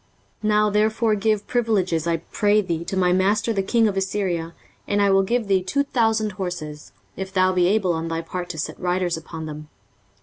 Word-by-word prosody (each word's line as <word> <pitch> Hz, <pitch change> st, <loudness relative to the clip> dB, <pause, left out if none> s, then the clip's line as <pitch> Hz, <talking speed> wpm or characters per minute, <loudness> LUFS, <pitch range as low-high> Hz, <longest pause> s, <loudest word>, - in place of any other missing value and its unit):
23:036:008 215 Hz, -, +1 dB
Now 210 Hz, 0 st, +3 dB
therefore 215 Hz, +2 st, +2 dB
give 210 Hz, 0 st, 0 dB
pledges, 190 Hz, -9 st, 0 dB
I 165 Hz, -1 st, +1 dB
pray 205 Hz, +5 st, +1 dB
thee, 170 Hz, -4 st, -3 dB
to 190 Hz, -, -3 dB
my 180 Hz, -1 st, +3 dB
master 200 Hz, +5 st, +2 dB
the 195 Hz, -, 0 dB
king 225 Hz, +3 st, +2 dB
of 200 Hz, -, -1 dB
Assyria, 190 Hz, -4 st, -2 dB, 0.3 s
and 205 Hz, -, +1 dB
I 200 Hz, -1 st, +4 dB
will 195 Hz, 0 st, +5 dB
give 230 Hz, +3 st, 0 dB
thee 195 Hz, -2 st, +3 dB
two 280 Hz, +10 st, 0 dB
thousand 225 Hz, -5 st, +1 dB
horses, 175 Hz, -6 st, -6 dB, 0.2 s
if 190 Hz, 0 st, -5 dB
thou 185 Hz, -1 st, +3 dB
be 180 Hz, -1 st, +3 dB
able 195 Hz, -3 st, +2 dB
on 165 Hz, 0 st, -3 dB
thy 165 Hz, 0 st, -2 dB
part 175 Hz, +2 st, -6 dB
to 170 Hz, -, -5 dB
set 155 Hz, -, -4 dB
riders 180 Hz, -1 st, 0 dB
upon 160 Hz, 0 st, -7 dB
them. 150 Hz, 0 st, -8 dB
190 Hz, 205 wpm, -23 LUFS, 175-210 Hz, 0.3 s, will